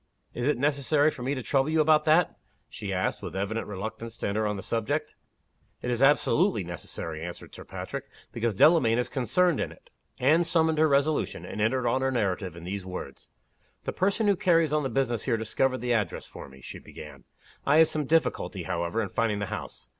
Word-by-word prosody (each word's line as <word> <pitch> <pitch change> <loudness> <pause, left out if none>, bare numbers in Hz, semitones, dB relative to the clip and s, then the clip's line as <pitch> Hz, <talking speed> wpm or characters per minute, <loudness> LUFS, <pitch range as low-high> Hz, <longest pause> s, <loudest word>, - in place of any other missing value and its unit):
"Is 120 +2 -2
it 150 - +2
necessary 145 +2 +2
for 125 - -10
me 135 +3 -1
to 130 - -5
trouble 135 +3 +1
you 160 0 +2
about 155 0 +4
that?" 160 +2 +4 0.3
she 105 -2 -6
asked 95 -1 -1
with - - -7
evident 100 +4 -2
reluctance 110 +3 -6
to - - -3
enter 105 +2 0
on 105 - -1
the 95 - -6
subject. 115 -2 -2 0.7
"It 125 - -1
is 120 0 -1
absolutely 150 - +3
necessary," 85 -2 -6
answered 85 0 -8
Sir - - -10
Patrick, 95 +9 -6 0.3
"because 115 -3 -1
Delamayn 125 - +5
is 125 - 0
concerned 145 - +1
in - - -2
it." - - -18 0.3
Anne 155 +7 +4
summoned 160 -2 +2
her 155 - +5
resolution, 145 +1 +1
and 105 - -5
entered 120 +3 +1
on 130 - +1
her 135 - +1
narrative 95 -7 -1
in 85 - -10
these 95 +2 -4
words: 90 0 -8 0.5
"The - - -3
person 200 +4 +1
who 200 -1 +4
carries 165 -4 +3
on 155 - +2
the 135 - -2
business 120 -2 0
here 120 -4 +1
discovered 130 +3 0
the 125 0 +1
address 105 -7 -1
for - - -10
me," 65 0 -15
she - - -8
began. - - -11 0.4
"I 145 +2 +4
had 160 0 +7
some 155 -1 -2
difficulty, 165 +2 0
however, 85 +6 -1
in 100 - -4
finding 110 +1 0
the 100 - -2
house. - - -7
125 Hz, 205 wpm, -27 LUFS, 105-150 Hz, 0.7 s, had